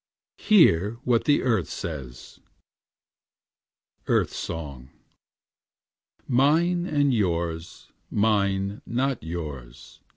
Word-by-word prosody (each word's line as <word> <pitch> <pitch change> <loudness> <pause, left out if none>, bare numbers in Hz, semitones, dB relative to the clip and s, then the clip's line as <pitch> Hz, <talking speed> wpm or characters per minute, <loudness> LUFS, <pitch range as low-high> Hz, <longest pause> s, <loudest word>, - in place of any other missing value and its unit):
Hear 105 - +4
what 120 -2 +1
the 145 - +3
Earth 120 -4 0
says: 70 -7 -7 1.7
EARTH - - +2
SONG 70 -6 -6 1.4
'Mine 165 +7 +2
and 145 -4 +2
yours; 85 -5 -2 0.2
Mine, 100 -2 0
not 130 +1 -1
yours. 75 -7 -8
100 Hz, 75 wpm, -25 LUFS, 80-135 Hz, 1.7 s, Hear